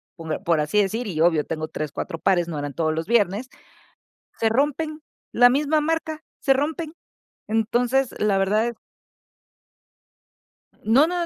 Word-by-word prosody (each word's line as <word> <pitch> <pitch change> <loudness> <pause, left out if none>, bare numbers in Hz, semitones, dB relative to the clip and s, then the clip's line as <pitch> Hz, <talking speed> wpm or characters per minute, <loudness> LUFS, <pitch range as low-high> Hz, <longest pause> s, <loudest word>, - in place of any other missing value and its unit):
por 160 +1 -5
por 170 -4 +2
así 150 +8 +1
decir 215 +4 0
y 170 -6 -4
obvio 165 -2 +3
tengo 155 -1 -4
3, 155 -2 -5
4 165 - -5
pares, 175 -2 +2
no 160 -3 -4
eran 145 -1 -4
todos 160 -1 0
los 160 +1 -3
viernes, 220 +1 +1 0.9
se 225 - +2
rompen. 300 +5 0 0.3
La 245 +1 +7
misma 295 +4 +2
marca, 315 0 -2 0.2
se 275 - +3
rompen. 305 +4 -2 0.5
Entonces, 240 +4 +1
la 205 -2 +2
verdad 215 +5 +1 2.1
No, 255 +8 +5
no, 350 0 -1
225 Hz, 145 wpm, -23 LUFS, 170-280 Hz, 2.1 s, La